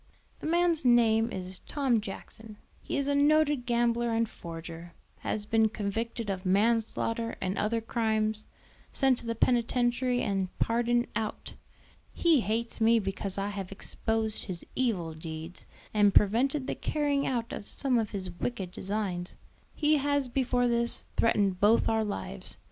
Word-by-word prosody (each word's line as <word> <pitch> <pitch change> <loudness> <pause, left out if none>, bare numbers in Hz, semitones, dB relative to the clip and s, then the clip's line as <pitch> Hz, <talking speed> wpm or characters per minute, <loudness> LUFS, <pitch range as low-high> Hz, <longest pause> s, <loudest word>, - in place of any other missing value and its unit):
"The - - -5
man's 340 -1 +2
name 230 -2 +4
is 185 0 -5
Tom 265 -6 0
Jackson; 215 +2 -9 0.2
he - - -3
is 280 0 0
a 285 - +2
noted 290 -2 +3
gambler 235 -1 +1
and 230 0 +2
forger, 165 -1 -9 0.2
has 210 -1 -3
been 220 0 +3
convicted 225 +2 -3
of 190 -2 -3
manslaughter 225 +3 +1
and 190 0 -2
other 225 +2 0
crimes, 220 -1 -1 0.4
sent 265 -2 +3
to 235 - -8
the 230 - -1
penitentiary 245 +1 +1
and 195 -3 0
pardoned 240 +1 +1
out. 220 -2 -4 0.6
He 330 -4 +4
hates 230 +1 -2
me 230 +1 +5
because 195 -1 -2
I 200 +1 -1
have 195 -2 -5
exposed 220 +2 -2
his 180 -4 -6
evil 195 -11 0
deeds, 160 +2 -8 0.3
and 205 -2 +4
prevented 260 +7 +3
the - - -2
carrying 290 -2 0
out 235 -3 -2
of 205 - -6
some 260 -4 +1
of 220 -2 -1
his 185 -3 -4
wicked 190 +1 -4
designs. 190 -2 -3 0.4
He 305 0 +3
has 285 -1 +1
before 245 -1 +1
this 235 0 +1
threatened 200 -5 +2
both 210 +4 +4
our 220 0 +2
lives. 95 - -5
225 Hz, 150 wpm, -29 LUFS, 200-245 Hz, 0.6 s, me